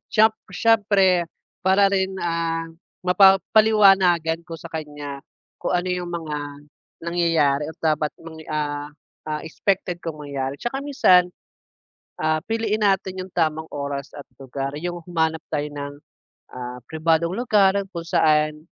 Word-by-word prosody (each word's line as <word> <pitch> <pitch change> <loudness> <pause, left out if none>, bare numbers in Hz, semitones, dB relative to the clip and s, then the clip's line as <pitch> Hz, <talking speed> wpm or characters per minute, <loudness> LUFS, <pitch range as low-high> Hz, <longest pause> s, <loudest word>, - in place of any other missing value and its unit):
Siyem 220 0 +5 0.2
siyempre, 200 -5 +3 0.4
para 190 +2 +4
rin, 190 -1 0
ah, 165 -1 -1 0.4
mapapaliwanagan 195 -3 +5
ko 165 -1 -9
sa - - -9
kaniya, 145 -3 -6 0.4
kung - - -1
ano 175 - -3
'yong 180 -1 -3
mga 160 -3 -4 0.7
nangyayari 165 -5 +2
at - - -15
dapat 155 -2 0
mang, 160 -1 -11
ah 145 -1 -3 0.4
ah, 150 - -2
expected 180 +1 -1
kong 160 -2 -5
mangyari. 140 -1 -4
'Tsaka 270 +3 -3
minsan, 185 -11 +4 0.9
ah, 155 0 0
piliin 220 -1 -1
natin 190 -2 +1
'yong 185 - -12
tamang 160 -2 -1
oras 140 0 -4
at 145 - -11
lugar, 135 +1 -5
'yong 175 +3 -4
humanap 160 -2 0
tayo 150 -1 -3
ng, 145 0 -6 0.6
ah, 125 0 -6
pribadong 165 +3 +1
lugar 210 -5 +3 0.2
kung 170 -3 -6
saan, 155 -1 +2
165 Hz, 130 wpm, -23 LUFS, 150-190 Hz, 0.9 s, Siyem